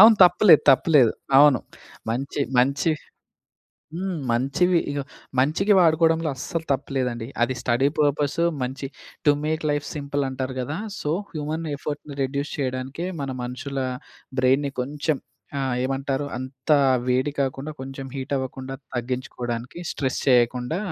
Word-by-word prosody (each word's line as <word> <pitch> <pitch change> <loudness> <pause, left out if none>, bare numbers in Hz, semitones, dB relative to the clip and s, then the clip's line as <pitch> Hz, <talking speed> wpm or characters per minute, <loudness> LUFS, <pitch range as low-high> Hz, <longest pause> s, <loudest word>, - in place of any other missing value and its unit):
అవును. 220 +2 +10
తప్పులేదు. 175 -2 +6
తప్పు 135 - +4
లేదు. 120 -5 +6 0.3
అవును. 145 -3 +7 0.5
మంచి, 135 +5 -2 0.2
మంచి 140 +5 +3 1.0
హ్మ్. 185 -1 -3
మంచివి 170 +9 +2
ఇగో 145 -1 -2 0.4
మంచికి 160 +10 +3
వాడుకోవడంలో 165 -1 +4
అస్సలు 160 +5 -4
తప్పు 140 +1 -3
లేదండి. 120 -3 -1 0.2
అది 130 +2 +2
స్టడీ 125 +3 +2
పర్పస్సు 145 +2 +2 0.2
మంచి 130 +2 -3 0.4
టు 145 - +7
మేక్ 155 +1 -1
లైఫ్ 145 0 -1
సింపుల్ 145 -1 -2
అంటారు 130 0 -4
కదా! 145 +5 -3 0.2
సో, 150 - -2 0.2
హ్యూమన్ 155 +1 -3
ఎఫర్ట్‌ని 145 0 -6
రెడ్యూస్ 140 +2 -2
చేయడానికే 130 +3 -3 0.2
మన 135 -1 -3
మనుషుల 125 +3 -5 0.6
బ్రెయిన్‌ని 135 +3 +3
కొంచెం 145 +3 -1 0.4
ఆహ్, 130 -2 0
ఏమంటారు 135 +1 -1
అంత 130 +3 -7 0.4
వేడి 130 +3 +1
కాకుండా 135 +2 -2
కొంచెం 135 0 -6
హీట్ 135 +1 -5
అవ్వకుండా 130 0 -5 0.2
తగ్గించుకోవడానికి 125 +1 -4
స్ట్రెస్ 130 -3 -2
చేయకుండా 125 +5 +3
140 Hz, 130 wpm, -24 LUFS, 130-150 Hz, 1.0 s, అవును